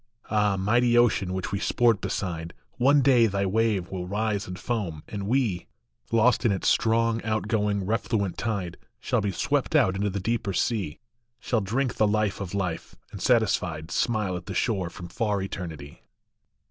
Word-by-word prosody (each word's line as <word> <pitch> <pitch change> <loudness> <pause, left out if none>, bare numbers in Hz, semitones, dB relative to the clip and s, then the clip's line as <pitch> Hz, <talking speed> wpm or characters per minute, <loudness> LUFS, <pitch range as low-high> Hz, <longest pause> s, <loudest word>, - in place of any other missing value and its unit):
Ah, 105 -2 +2
mighty 120 +5 +3
ocean 110 -6 +3
which 95 -2 -3
we 100 - -1
sport 115 -2 +2
beside, 85 -3 -4 0.2
One 140 +3 +5
day 125 -4 +5
thy 100 -1 -1
wave 105 -2 0
will 90 -2 -4
rise 105 0 -1
and 90 -1 -6
foam, 95 -11 -3
and 100 -2 -5
we, 115 -7 0 0.4
Lost 115 +2 +3
in 115 - +3
its 95 - -1
strong, 115 0 +2
outgoing, 105 -2 0
refluent 105 -2 -1
tide, 100 -6 -3 0.2
Shall 125 -3 0
be 100 -1 -1
swept - - -1
out 95 - +4
into 100 +2 0
the 100 +1 -3
deeper 110 0 -1
sea, 100 -8 -1 0.4
Shall 115 -3 0
drink 120 +6 -1
the 110 - +4
life 105 -1 0
of 100 0 -5
life, 90 -4 -3 0.2
and 100 - -8
satisfied 90 -9 +1
Smile 105 -6 0
at 90 -1 -7
the - - -5
shore 95 -7 0
from 90 -1 -9
far 105 -1 -1
eternity. 80 -7 -6
105 Hz, 170 wpm, -26 LUFS, 95-115 Hz, 0.4 s, One